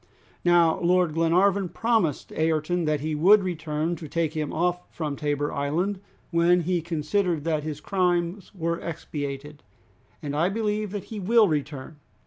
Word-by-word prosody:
Now, 175 -2 +4
Lord 180 -2 +2
Glenarvan 180 +4 +2
promised 220 - 0
Ayrton 160 +2 0
that 150 -2 0
he 155 +1 -2
would 190 +7 +5
return 160 -2 -2
to 155 - -8
take 160 0 -1
him 155 -3 -2
off 175 +2 -1
from 150 -3 -3
Tabor 145 0 -1
Island 170 +8 -1 0.3
when 175 +1 +4
he 175 +1 0
considered 165 +1 -1
that 155 -2 0
his 150 -1 -5
crimes 180 +1 -1
were 170 -1 -2
expiated, 145 -2 -6 0.6
and 145 -1 -5
I 165 +4 +2
believe 210 0 -1
that 200 -1 -5
he 215 - -4
will 220 +3 +4
return." 150 -2 -3
170 Hz, 150 wpm, -25 LUFS, 150-180 Hz, 0.6 s, would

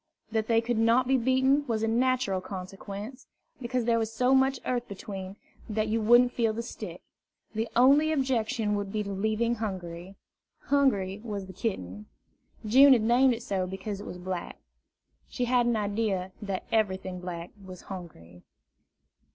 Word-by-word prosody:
That 220 -1 0
they 230 -1 +3
could 235 -1 -1
not 230 +3 +3
be 265 - +3
beaten 260 +3 +3
was 225 -2 -1
a - - +2
natural 235 -5 +1
consequence, 195 +6 -8 0.3
because 245 -1 -1
there 230 -1 +3
was 225 -1 -2
so 250 +3 +2
much 265 0 +3
earth 245 -1 -1
between, 195 -1 -7 0.3
that 215 0 -1
you 225 +1 +1
wouldn't 240 +3 +5
feel 225 -2 +1
the 230 +2 -4
stick. 235 - -8 0.5
The 225 +1 -2
only 280 +6 +5
objection 245 -6 0
would 205 -1 -2
be 210 0 -1
leaving 220 +4 -1
Hungry. 185 -3 -5 0.5
Hungry 210 -9 +1
was 205 -4 -4
the 190 - -11
kitten. 105 - -4 0.6
June 265 +6 +7
had 235 -4 +3
named 245 +2 +4
it 230 - -9
so 190 -4 -1
because 195 +2 -5
it - - -9
was 180 - -7
black. 180 -1 -5 0.7
She 250 - -2
had 245 0 +2
an 240 - +2
idea 205 -3 -1
that 195 -3 -3
everything 190 -4 0
black 175 -1 -6
was 185 -1 -10
hungry. 90 - -10
220 Hz, 160 wpm, -28 LUFS, 190-245 Hz, 0.7 s, June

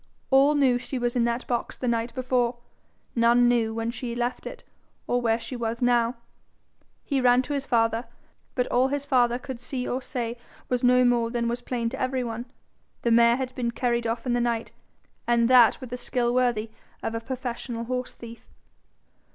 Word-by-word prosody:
All 275 +3 +5
knew 260 -4 +3
she 260 - -5
was 240 0 -1
in 240 -1 +2
that 235 +1 -1
box 240 -1 -3
the 250 - -3
night 235 0 0
before; 250 -2 0 0.6
none 235 +1 +5
knew 235 -2 +2
when 225 +1 -2
she 240 -1 -5
left 240 +1 -2
it - - -9 0.4
or 245 0 0
where 225 -1 +1
she 255 - -7
was 235 -1 -3
now. 245 -1 +2 0.9
He 275 -3 0
ran 250 0 +4
to 290 - -4
his 280 -1 -3
father, 230 0 +1 0.5
but 250 - +1
all 255 +2 +3
his 285 +1 -2
father 245 -3 +3
could 260 -2 -7
see 250 +1 -4
or 255 - -2
say 240 -2 -4 0.3
was 250 -1 0
no 250 0 +5
more 240 -1 +2
than 235 0 -1
was 240 +1 -2
plain 240 -2 -2
to 265 - -6
every 255 0 0
one: 235 +1 -5 0.6
the 235 - +2
mare 235 0 +6
had 260 -1 -4
been 245 -2 -2
carried 235 0 -1
off 230 +1 -3
in 245 - 0
the 240 - +1
night, 235 -1 -1 0.6
and 235 -1 +3
that 250 -2 +6
with 250 -1 -8
a - - -2
skill 240 -1 -1
worthy 240 -3 +1 0.3
of 225 - -2
a 230 - -2
professional 240 -1 -5
horse 250 +1 -4
thief. 230 0 -12
245 Hz, 195 wpm, -26 LUFS, 235-255 Hz, 0.9 s, mare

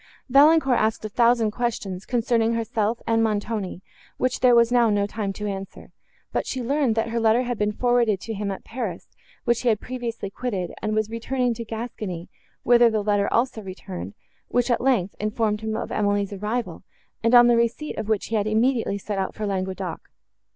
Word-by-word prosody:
Valancourt 275 -1 +5
asked 215 0 0
a - - -3
thousand 235 0 +3
questions, 210 -5 -3
concerning 230 -2 +1
herself 225 0 -1
and 225 0 +2
Montoni, 210 -3 -2 0.3
which 255 0 0
there 250 -1 +5
was 235 0 +5
now 240 -2 +4
no 205 -1 +2
time 205 -1 -3
to 210 - -6
answer; 195 -1 -6 0.4
but - - -1
she 260 - -3
learned, 270 -2 +1
that 225 0 0
her 230 +1 -1
letter 225 +2 +3
had 245 -2 -3
been 210 0 +1
forwarded 235 -2 +2
to 225 - -5
him, 205 -1 -3
at 195 - -5
Paris, 225 -8 -5 0.4
which 235 -1 +2
he 250 - +2
had 215 -2 +2
previously 235 -5 -5
quitted, 195 -7 -3
and 215 0 -1
was 215 0 0
returning 245 +2 -1
to 230 - -6
Gascony, 220 -6 -6 0.3
whither 240 0 +6
the 215 -2 -1
letter 205 -1 +1
also 235 -1 +1
returned, 190 0 -7 0.3
which, 245 0 +1
at 235 - +1
length, 235 -8 +1
informed 215 0 -1
him 220 0 -2
of - - -5
Emily's 205 -1 0
arrival, 215 +5 -3 0.4
and 230 +2 +4
on 240 0 +9
the 240 0 +5
receipt 235 +6 0
of 215 - -4
which 215 -3 +1
he 225 - -1
had 210 -1 +1
immediately 225 -1 +1
set 200 0 -4
out 190 - -3
for 215 - -3
Languedoc. 190 -3 -4
225 Hz, 195 wpm, -24 LUFS, 205-240 Hz, 0.4 s, on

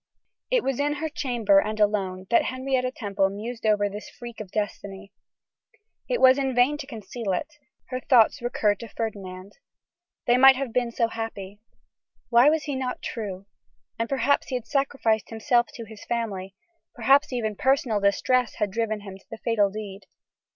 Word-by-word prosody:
It - - +2
was 270 -1 -1
in 290 +1 +1
her 315 +2 -3
chamber 240 - +2
and 215 +2 -2
alone, 195 -3 0
that 235 - +4
Henrietta 255 0 -1
Temple 200 -5 0
mused 220 +3 -5
over 205 -1 +3
this 205 +1 -8
freak 240 -1 -10
of 205 - -8
destiny. 200 -1 -5 1.0
It - - 0
was 260 +1 +6
in 265 -2 -1
vain 250 +4 +4
to 280 - -7
conceal 220 -3 -5
it, 295 - -4 0.3
her 255 -1 -3
thoughts 250 +1 +4
recurred 210 -4 0
to 230 - -7
Ferdinand. 200 -3 -6 0.7
They 240 0 +4
might 265 +1 +8
have 260 -3 -4
been 245 -1 +1
so 230 0 +1
happy! 210 -3 -6 0.7
Why 240 +4 +6
was 310 -1 +1
he 285 - -3
not 255 -1 -4
true? 200 -4 -5 0.5
And 230 - -1
perhaps 275 +1 +1
he 260 - -3
had 245 -2 -3
sacrificed 270 -5 0
himself 240 +1 +1
to 230 - -7
his 220 -1 -12
family, 200 -5 -3 0.4
perhaps 270 +5 +4
even 220 -4 -2
personal 260 -3 +1
distress 235 +5 +1
had 205 -2 -1
driven 220 0 -2
him 195 -1 -10
to - - -26
the 225 - -7
fatal 220 -3 +1
deed. 200 -1 -8
230 Hz, 170 wpm, -25 LUFS, 205-255 Hz, 1.0 s, might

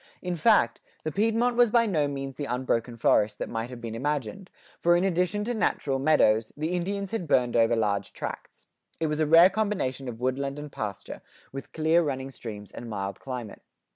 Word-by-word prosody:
In 180 -1 -2
fact, 215 +6 +3 0.2
the 155 - -2
Piedmont 230 +5 +1
was 240 -1 +5
by 230 +1 +4
no 155 -9 +1
means 135 -1 -5
the 145 - -4
unbroken 125 -2 -1
forest 105 -2 +2
that - - -4
might 115 +1 -3
have 125 -2 -8
been 115 -2 -6
imagined, 145 - -3 0.3
for 175 0 +4
in 175 - +2
addition 180 +2 +1
to 240 +3 -2
natural 140 - 0
meadows, 115 -7 +3
the 155 +2 -2
Indians 195 +2 -3
had 225 -7 -3
burned 125 -4 +2
over 115 0 +4
large 105 -3 0
tracts.[89:2] - - -8 0.4
It - - +2
was 150 0 -1
a 155 - +2
rare 165 +4 +7
combination 190 -11 -1
of 115 -2 -6
woodland 135 +2 -2
and 150 0 -7
pasture, 105 -5 -6 0.3
with 135 0 -8
clear 160 +2 +3
running 135 -4 -3
streams 105 -5 -8
and 120 - -8
mild 100 -2 -4
climate. 125 -5 -7
140 Hz, 195 wpm, -27 LUFS, 120-180 Hz, 0.4 s, rare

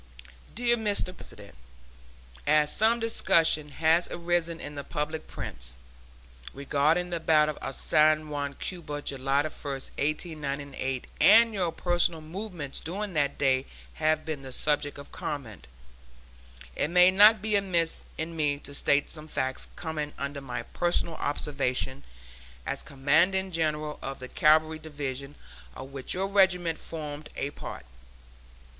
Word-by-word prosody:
DEAR 240 +1 +2
MR. 205 -4 0
PRESIDENT: 100 - -8 0.9
As 150 0 +4
some 225 +2 +3
discussion 165 -9 +3
has 160 +4 +2
arisen 170 -1 -1
in 145 - -7
the 140 -1 -6
public 155 +2 -4
prints 60 - -3 0.8
regarding 150 +6 +1
the 170 - -1
battle 155 -2 +3
of 135 - -4
San 155 0 +3
Juan, 145 -1 -3
Cuba, 150 -4 -5
July 135 +1 0
1, 155 - -4
1898, 140 -2 -3 0.2
and 225 +2 +7
your 180 -5 0
personal 175 -1 +1
movements 165 -3 -4
during 195 +4 -4
that 145 -3 0
day 135 -1 +1 0.3
have 155 0 0
been 155 -3 -4
the 135 -1 -9
subject 145 +2 +1
of 140 - -11
comment, 110 - -6 1.1
it - - +1
may 180 +1 +7
not 210 +3 +7
be 210 +1 -1
amiss 175 -5 +1
in 165 +1 -4
me 145 -3 +1
to 145 0 -9
state 140 0 +2
some 155 -1 -4
facts 130 -3 -2
coming 155 -3 -4
under 140 0 -4
my 125 -2 -5
personal 175 -1 0
observation 140 -2 0 0.6
as - - -2
Commanding 170 +8 +2
General 155 -2 -1
of 135 0 -5
the 130 - -8
Cavalry 155 +3 +3
Division 145 -2 -5 0.4
of 135 +1 -9
which 135 +3 -4
your 190 +1 0
regiment 180 -4 +2
formed 150 -2 -7
a 140 - -3
part. 65 - -8
155 Hz, 135 wpm, -28 LUFS, 140-175 Hz, 1.1 s, and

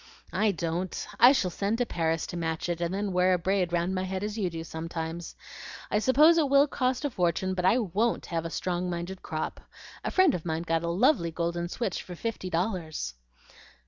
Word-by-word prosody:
"I 215 0 +2
don't! 170 +1 -3
I 245 +2 +9
shall 190 -10 +1
send 200 +5 -1
to 245 - +1
Paris 165 -5 -1
to - - -7
match 165 0 -2
it, 170 0 -2
and 170 0 0
then 200 +1 -2
wear 180 +1 +4
a - - +1
braid 185 0 0
round 175 +2 0
my 185 - -1
head 190 +1 -3
as 210 0 -3
you 200 -5 0
do 165 -1 -6
sometimes. 165 +1 -5 0.6
I 210 - +3
suppose 300 +8 +5
it 295 -3 +2
will 280 +1 +6
cost 255 0 -1
a 285 - -1
fortune, 185 -1 0
but 180 -1 -1
I 200 +6 +5
WON'T 220 +1 0
have 165 -2 -2
a 165 - -4
strong 180 +1 -2
minded 175 +2 -4
crop. 155 0 -4 0.4
A - - -1
friend 370 -6 +4
of 165 - -3
mine 160 -1 -2
got 165 -1 0
a 170 - -2
lovely 185 - +3
golden 170 +1 -2
switch 205 -1 -2
for 180 - -9
fifty 215 -1 -4
dollars." 165 - -2
180 Hz, 210 wpm, -28 LUFS, 170-210 Hz, 0.6 s, I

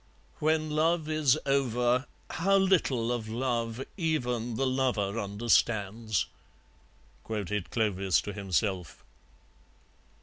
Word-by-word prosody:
"When 155 0 +1
love 160 +1 +1
is 155 -3 +3
over, 125 -2 +1 0.2
how 195 +4 +2
little 150 -12 +2
of 115 -3 -3
love 120 0 -2
even 125 - -1
the 135 - 0
lover 125 -6 0
understands," 110 0 +1 1.0
quoted 105 -3 -3
Clovis 95 -7 +1
to 105 - -6
himself. 95 -3 -2
120 Hz, 95 wpm, -29 LUFS, 105-140 Hz, 1.0 s, is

